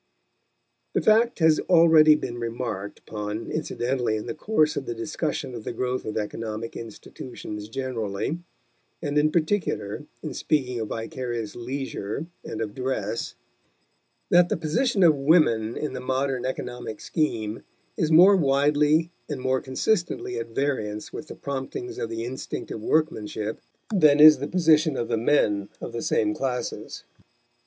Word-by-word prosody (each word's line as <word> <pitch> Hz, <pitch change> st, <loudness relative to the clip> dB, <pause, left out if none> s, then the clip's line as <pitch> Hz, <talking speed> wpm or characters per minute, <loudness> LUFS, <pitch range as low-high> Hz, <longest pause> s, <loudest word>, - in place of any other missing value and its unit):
The -, -, +2 dB
fact 230 Hz, +2 st, +4 dB
has 160 Hz, -2 st, +4 dB
already 160 Hz, -3 st, +7 dB
been 120 Hz, -5 st, -4 dB
remarked 115 Hz, -4 st, -4 dB
upon 105 Hz, +1 st, -5 dB
incidentally 125 Hz, -6 st, -1 dB
in 105 Hz, -, -4 dB
the -, -, -4 dB
course 155 Hz, -3 st, +1 dB
of 135 Hz, -, -4 dB
the 120 Hz, -, -3 dB
discussion 150 Hz, +2 st, -3 dB
of 115 Hz, -3 st, -7 dB
the -, -, -4 dB
growth 125 Hz, +2 st, -2 dB
of 110 Hz, -, -3 dB
economic 110 Hz, +1 st, -4 dB
institutions 105 Hz, -1 st, -8 dB
generally, 115 Hz, +2 st, -3 dB, 0.6 s
and 145 Hz, -3 st, -3 dB
in 150 Hz, +1 st, +3 dB
particular 155 Hz, -, -1 dB, 0.2 s
in 155 Hz, -4 st, -4 dB
speaking 130 Hz, -5 st, 0 dB
of 110 Hz, -, -3 dB
vicarious 115 Hz, 0 st, -4 dB
leisure 130 Hz, 0 st, -4 dB, 0.2 s
and 110 Hz, -, -5 dB
of 105 Hz, -2 st, -3 dB
dress, 120 Hz, -4 st, -3 dB, 1.0 s
that 175 Hz, 0 st, +6 dB
the -, -, 0 dB
position 195 Hz, -, +1 dB
of 165 Hz, -3 st, +7 dB
women 135 Hz, -7 st, +3 dB
in 150 Hz, -, -3 dB
the 130 Hz, -, -4 dB
modern 130 Hz, 0 st, -1 dB
economic 125 Hz, -3 st, -5 dB
scheme 115 Hz, -9 st, -2 dB, 0.3 s
is 160 Hz, -1 st, 0 dB
more 180 Hz, +5 st, +8 dB
widely 150 Hz, +1 st, +3 dB, 0.2 s
and 145 Hz, -3 st, -3 dB
more 130 Hz, 0 st, 0 dB
consistently 130 Hz, -, -1 dB
at 115 Hz, -, -4 dB
variance 115 Hz, -4 st, -2 dB
with 155 Hz, -, -7 dB
the -, -, -8 dB
promptings 140 Hz, -, -5 dB
of 115 Hz, -, -3 dB
the 115 Hz, 0 st, -4 dB
instinct 130 Hz, +2 st, -6 dB
of 110 Hz, -, -5 dB
workmanship 110 Hz, -7 st, -1 dB, 0.3 s
than 155 Hz, -6 st, +5 dB
is 155 Hz, -1 st, +9 dB
the 140 Hz, -, -3 dB
position 160 Hz, -4 st, +3 dB
of 120 Hz, -, -2 dB
the -, -, +1 dB
men 105 Hz, -5 st, +2 dB
of -, -, -7 dB
the 115 Hz, -, -3 dB
same 105 Hz, -1 st, +1 dB
classes. 125 Hz, +1 st, -4 dB
130 Hz, 150 wpm, -25 LUFS, 115-155 Hz, 1.0 s, is